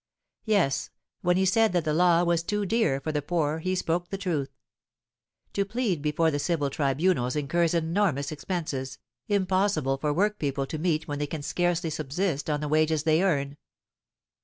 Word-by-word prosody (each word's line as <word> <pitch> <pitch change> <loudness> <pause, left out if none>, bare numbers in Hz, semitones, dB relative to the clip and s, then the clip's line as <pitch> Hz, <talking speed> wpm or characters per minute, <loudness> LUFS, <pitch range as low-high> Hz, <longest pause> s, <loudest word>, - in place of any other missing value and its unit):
Yes, 200 -11 +1 0.3
when 180 0 +2
he 190 - +2
said 220 +2 +3
that 175 -3 +1
the 155 - +1
law 175 +1 +4
was 170 -1 +2
too 205 +4 -2
dear 190 - +1
for 155 - -3
the 150 -1 -1
poor 155 0 -1
he 185 +3 -1
spoke 175 0 -1
the 195 - -3
truth. 160 -8 -2 1.0
To 200 - +1
plead 205 - -1
before 155 +2 +1
the 145 - -1
civil 145 -3 0
tribunals 140 -2 +1
incurs 165 +3 +1
enormous 165 -4 0
expenses, 150 -5 -4 0.3
impossible 190 - +1
for 150 +1 0
workpeople 150 -6 0
to 155 +3 -5
meet 160 -2 0
when 145 -1 -3
they 145 - -1
can 150 0 -5
scarcely 175 +1 0
subsist 155 +1 -2
on 150 -1 0
the 150 - -2
wages 155 0 +2
they 160 +1 +3
earn. 145 -6 0
160 Hz, 170 wpm, -27 LUFS, 145-185 Hz, 1.0 s, law